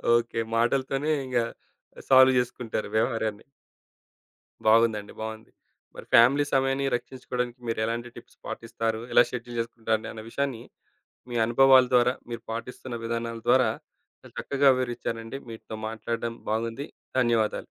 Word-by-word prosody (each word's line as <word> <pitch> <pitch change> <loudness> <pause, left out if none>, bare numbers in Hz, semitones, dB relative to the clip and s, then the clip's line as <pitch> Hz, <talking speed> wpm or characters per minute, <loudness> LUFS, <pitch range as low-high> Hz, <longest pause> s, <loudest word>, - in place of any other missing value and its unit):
Okay. 120 -1 0 0.2
మాటలతోనే 135 +5 +1
ఇంగ, 125 -1 -2 0.7
solve 130 -1 +7
జేసుకుంటారు 120 -3 -2
వ్యవహారాన్ని. 110 -2 -1 1.2
బాగుందండి. 110 -2 +3
బావుంది. 110 0 -7 0.4
మరి - - -10
ఫ్యామిలీ 135 +5 +6
సమయాన్ని 135 +1 +1
రక్షించుకోడానికి 125 -1 -5
మీరు 115 - -1
ఎలాంటి 115 +2 -3
టిప్స్ - - -14
పాటిస్తారు? 115 -1 -3
ఎలా - - +8
షెడ్యూల్ 120 -1 -6
జేసుకుంటారు? 115 -1 -2
అన్న 110 -1 -8
విషయాన్ని 135 -4 -2 0.7
మీ 120 - -3
అనుభవాల 130 +1 +6
ద్వారా, 125 0 +5 0.2
మీరు 115 -1 -5
పాటిస్తున్న 120 +1 -6
విధానాల 115 0 -3
ద్వారా, - - +5 0.5
చాలా - - -14
చక్కగా 140 -1 +3
వివరిచ్చారండి. 120 0 -4
మీతో 110 -1 -8
మాట్లాడ్డం 115 +1 -4 0.2
బాగుంది. 115 +6 -2 0.3
ధన్యవాదాలు. 115 -3 +1
120 Hz, 120 wpm, -26 LUFS, 115-130 Hz, 1.2 s, ఎలా